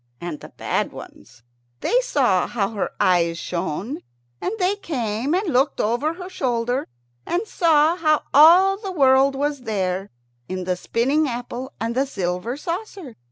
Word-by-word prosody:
And 170 Hz, -3 st, -5 dB
the -, -, -11 dB
bad -, -, -2 dB
ones, 120 Hz, -2 st, -13 dB, 0.4 s
they -, -, +2 dB
saw 255 Hz, -, +2 dB
how 200 Hz, -4 st, -1 dB
her 210 Hz, -3 st, -2 dB
eyes 170 Hz, -2 st, +2 dB
shone, 180 Hz, -, -4 dB, 0.4 s
and -, -, -1 dB
they 380 Hz, 0 st, +1 dB
came 255 Hz, -, -2 dB
and 370 Hz, -3 st, -1 dB
looked 265 Hz, +4 st, +2 dB
over 245 Hz, +9 st, 0 dB
her 360 Hz, 0 st, -8 dB
shoulder, 245 Hz, -5 st, -1 dB, 0.4 s
and 360 Hz, +6 st, -1 dB
saw 320 Hz, -3 st, +3 dB
how 310 Hz, -3 st, +2 dB
all 355 Hz, +7 st, +7 dB
the 395 Hz, -2 st, -6 dB
world 270 Hz, -4 st, +4 dB
was 285 Hz, 0 st, -1 dB
there, 195 Hz, -4 st, -2 dB, 0.4 s
in 185 Hz, 0 st, -3 dB
the 180 Hz, 0 st, -1 dB
spinning 270 Hz, +11 st, +1 dB
apple 245 Hz, +1 st, -5 dB
and 230 Hz, +1 st, -2 dB
the 265 Hz, +3 st, 0 dB
silver 190 Hz, +2 st, -3 dB
saucer. 345 Hz, -, -6 dB
265 Hz, 155 wpm, -22 LUFS, 210-320 Hz, 0.4 s, all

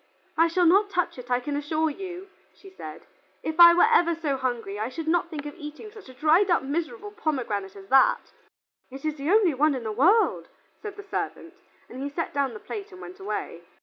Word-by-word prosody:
"I 330 Hz, +1 st, +4 dB
shall 350 Hz, +2 st, +1 dB
not 400 Hz, +5 st, +4 dB
touch 360 Hz, -8 st, -1 dB
it, 245 Hz, 0 st, -11 dB
I 245 Hz, 0 st, +2 dB
can 285 Hz, +3 st, -4 dB
assure 310 Hz, +2 st, 0 dB
you," 370 Hz, +3 st, -8 dB, 0.3 s
she 390 Hz, -, -15 dB
said. 375 Hz, -, -10 dB, 0.4 s
"If 315 Hz, +2 st, -4 dB
I 340 Hz, 0 st, +10 dB
were 350 Hz, -, +6 dB
ever 340 Hz, -6 st, +4 dB
so 305 Hz, -4 st, -2 dB
hungry, 240 Hz, -6 st, -3 dB
I 220 Hz, +3 st, -2 dB
should 315 Hz, +5 st, -7 dB
not 340 Hz, +1 st, +1 dB
think 300 Hz, -3 st, -6 dB
of 295 Hz, -, -6 dB
eating 310 Hz, +6 st, -9 dB
such 425 Hz, -9 st, -14 dB
a -, -, -11 dB
dried 320 Hz, +8 st, +3 dB
up 345 Hz, -, +3 dB
miserable 340 Hz, -, -4 dB
pomegranate 250 Hz, -, -3 dB
as 195 Hz, -1 st, -12 dB
that." 265 Hz, 0 st, +3 dB, 0.6 s
"It 270 Hz, +3 st, -10 dB
is 310 Hz, -1 st, -2 dB
the 285 Hz, +3 st, -3 dB
only 395 Hz, -5 st, +4 dB
one 290 Hz, +2 st, +2 dB
in 250 Hz, -, -5 dB
the 220 Hz, -, -3 dB
world," 360 Hz, -, +3 dB, 0.3 s
said 415 Hz, -2 st, -7 dB
the 410 Hz, -, -8 dB
servant, 340 Hz, -3 st, -5 dB, 0.3 s
and 260 Hz, -, -9 dB
he 280 Hz, -, -3 dB
set 330 Hz, +4 st, -4 dB
down 280 Hz, -1 st, 0 dB
the -, -, -8 dB
plate 425 Hz, -1 st, -7 dB
and 370 Hz, -, -12 dB
went 370 Hz, +2 st, -10 dB
away. 390 Hz, -, -5 dB
320 Hz, 220 wpm, -26 LUFS, 275-375 Hz, 0.6 s, I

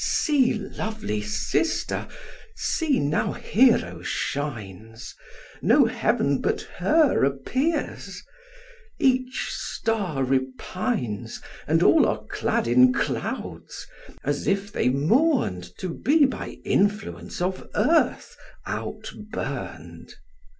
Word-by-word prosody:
See, 275 Hz, -6 st, +2 dB
lovely 215 Hz, -, -4 dB
sister! 105 Hz, -, -1 dB, 0.5 s
see, 310 Hz, -5 st, 0 dB
now 145 Hz, +2 st, 0 dB
Hero 240 Hz, +2 st, +2 dB
shines, 115 Hz, -5 st, -4 dB, 0.5 s
No -, -, +5 dB
heaven 140 Hz, -1 st, +1 dB
but -, -, 0 dB, 0.2 s
her 300 Hz, -, +3 dB
appears; 255 Hz, -, -1 dB, 0.7 s
each 255 Hz, -1 st, +1 dB
star 200 Hz, -11 st, -2 dB
repines, 130 Hz, -, -2 dB, 0.3 s
And -, -, +3 dB
all -, -, +6 dB
are -, -, -2 dB
clad -, -, 0 dB
in 125 Hz, +1 st, +6 dB
clouds, -, -, -4 dB, 0.4 s
as 145 Hz, +1 st, -2 dB
if 200 Hz, +1 st, 0 dB
they 125 Hz, -, +1 dB
mourn'd 150 Hz, -, +2 dB
To 185 Hz, -, -4 dB
be 285 Hz, -, +3 dB
by 265 Hz, -, -4 dB
influence 205 Hz, +1 st, 0 dB
of 185 Hz, +1 st, -2 dB
earth 305 Hz, +10 st, +2 dB, 0.3 s
out -, -, -5 dB, 0.2 s
burn'd. 85 Hz, -, -6 dB
185 Hz, 95 wpm, -25 LUFS, -, 0.7 s, all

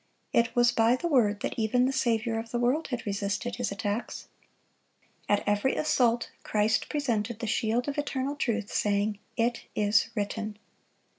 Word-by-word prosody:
It 235 Hz, +1 st, +2 dB
was 240 Hz, 0 st, +5 dB
by 230 Hz, +2 st, +4 dB
the 345 Hz, -, -2 dB
Word 215 Hz, -9 st, +2 dB
that -, -, -2 dB
even 245 Hz, +3 st, +2 dB
the 265 Hz, -, 0 dB
Saviour 230 Hz, -3 st, +1 dB
of 230 Hz, 0 st, -7 dB
the 240 Hz, -, -2 dB
world 250 Hz, +7 st, +1 dB
had 245 Hz, -3 st, -4 dB
resisted 205 Hz, +3 st, -2 dB
his 245 Hz, -3 st, -2 dB
attacks. 205 Hz, +2 st, -4 dB, 1.0 s
At 205 Hz, -, +3 dB
every 205 Hz, +6 st, +2 dB
assault, 245 Hz, -6 st, +2 dB
Christ 215 Hz, +1 st, +1 dB
presented 235 Hz, -7 st, -1 dB
the 230 Hz, -, -4 dB
shield 230 Hz, +3 st, 0 dB
of 285 Hz, 0 st, -2 dB
eternal 280 Hz, -1 st, -2 dB
truth, 225 Hz, -7 st, -2 dB
saying, 205 Hz, 0 st, +1 dB, 0.2 s
"It 235 Hz, 0 st, 0 dB
is 210 Hz, +1 st, +3 dB
written." 210 Hz, 0 st, -3 dB
230 Hz, 160 wpm, -28 LUFS, 210-245 Hz, 1.0 s, was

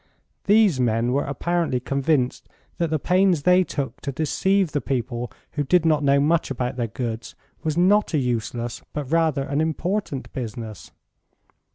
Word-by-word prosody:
These 205 Hz, -8 st, +4 dB
men 120 Hz, 0 st, +1 dB
were 140 Hz, +3 st, +1 dB
apparently 160 Hz, 0 st, -1 dB
convinced 135 Hz, 0 st, 0 dB, 0.3 s
that 170 Hz, -1 st, +1 dB
the 155 Hz, -, +1 dB
pains 180 Hz, 0 st, +2 dB
they 180 Hz, +2 st, +5 dB
took 135 Hz, -6 st, -4 dB
to 140 Hz, -, -3 dB
deceive 180 Hz, +5 st, +1 dB
the 145 Hz, -, -1 dB
people 120 Hz, -1 st, -3 dB, 0.2 s
who 145 Hz, -, -1 dB
did 170 Hz, +4 st, +3 dB
not 155 Hz, -2 st, +3 dB
know 140 Hz, 0 st, +4 dB
much 155 Hz, +3 st, +2 dB
about 125 Hz, -1 st, -2 dB
their 120 Hz, -2 st, -1 dB
goods 115 Hz, 0 st, -5 dB, 0.3 s
was 155 Hz, 0 st, -2 dB
not 195 Hz, 0 st, +3 dB
a -, -, +3 dB
useless 120 Hz, -2 st, -2 dB
but 145 Hz, -2 st, -4 dB
rather 160 Hz, -4 st, +2 dB
an 145 Hz, +2 st, -1 dB
important 160 Hz, -1 st, -2 dB
business. 115 Hz, -3 st, -6 dB
145 Hz, 160 wpm, -23 LUFS, 125-170 Hz, 0.3 s, they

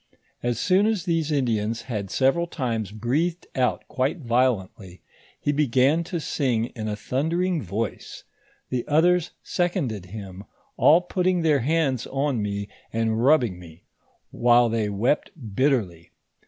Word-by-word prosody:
As 120 Hz, -1 st, -1 dB
soon 185 Hz, +9 st, +3 dB
as 215 Hz, -6 st, -1 dB
these 165 Hz, -3 st, 0 dB
Indians 115 Hz, -5 st, 0 dB
had 105 Hz, -6 st, -4 dB
several 135 Hz, -, +2 dB
times 115 Hz, -, -3 dB
breathed 145 Hz, -, -1 dB
out 125 Hz, -1 st, 0 dB
quite 135 Hz, +6 st, -1 dB
violently, 115 Hz, -, -1 dB, 0.4 s
he 145 Hz, -, 0 dB
began 145 Hz, +2 st, +2 dB
to 175 Hz, 0 st, -3 dB
sing 125 Hz, -7 st, 0 dB
in 110 Hz, -2 st, -4 dB
a 105 Hz, -, -2 dB
thundering 165 Hz, -, -1 dB
voice, 105 Hz, +3 st, -5 dB, 0.5 s
the 125 Hz, -2 st, -1 dB
othere 175 Hz, +4 st, +4 dB, 0.2 s
seconded 140 Hz, -, -2 dB
him, 100 Hz, -1 st, -8 dB, 0.3 s
all 165 Hz, +4 st, +5 dB
put 180 Hz, 0 st, -2 dB
ting 180 Hz, -2 st, +2 dB
their 150 Hz, -3 st, +3 dB
hands 135 Hz, -2 st, 0 dB
on 135 Hz, -3 st, -1 dB
me, 100 Hz, 0 st, -3 dB, 0.2 s
and 115 Hz, 0 st, 0 dB
rubbing 125 Hz, -, +3 dB
me, 85 Hz, -1 st, -14 dB, 0.5 s
while 120 Hz, 0 st, +4 dB
they 110 Hz, -2 st, 0 dB
wept 110 Hz, +8 st, 0 dB, 0.2 s
bitterly. 100 Hz, -, 0 dB
125 Hz, 140 wpm, -24 LUFS, 110-155 Hz, 0.5 s, all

